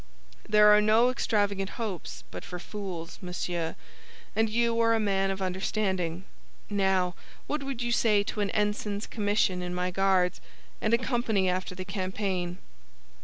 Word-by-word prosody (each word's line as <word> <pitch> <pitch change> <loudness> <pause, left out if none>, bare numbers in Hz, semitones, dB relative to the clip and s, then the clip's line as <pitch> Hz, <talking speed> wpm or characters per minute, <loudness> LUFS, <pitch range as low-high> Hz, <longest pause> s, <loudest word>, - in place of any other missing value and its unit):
"There 210 0 +7
are 210 - +5
no 220 +4 +5
extravagant 205 -6 0
hopes 180 - -5
but 90 - -7
for 180 - -6
fools, 180 -3 -6
monsieur, 175 -2 -3 0.6
and 220 0 +2
you 230 +1 +1
are 230 0 +4
a - - +1
man 195 -2 +1
of 195 0 -2
understanding. 185 -2 -1 0.5
Now, 190 -3 +2 0.3
what 300 0 -2
would 270 -3 -3
you 240 - -1
say 215 -3 +3
to 210 0 -3
an 200 - 0
ensign's 210 0 -1
commission 205 -3 +1
in 180 0 -4
my 180 0 -1
Guards, 185 -1 +2 0.4
and 220 - +1
a - - +2
company 230 -6 +1
after 185 0 -3
the 185 0 -6
campaign?" 185 -2 -2
200 Hz, 155 wpm, -28 LUFS, 185-215 Hz, 0.6 s, There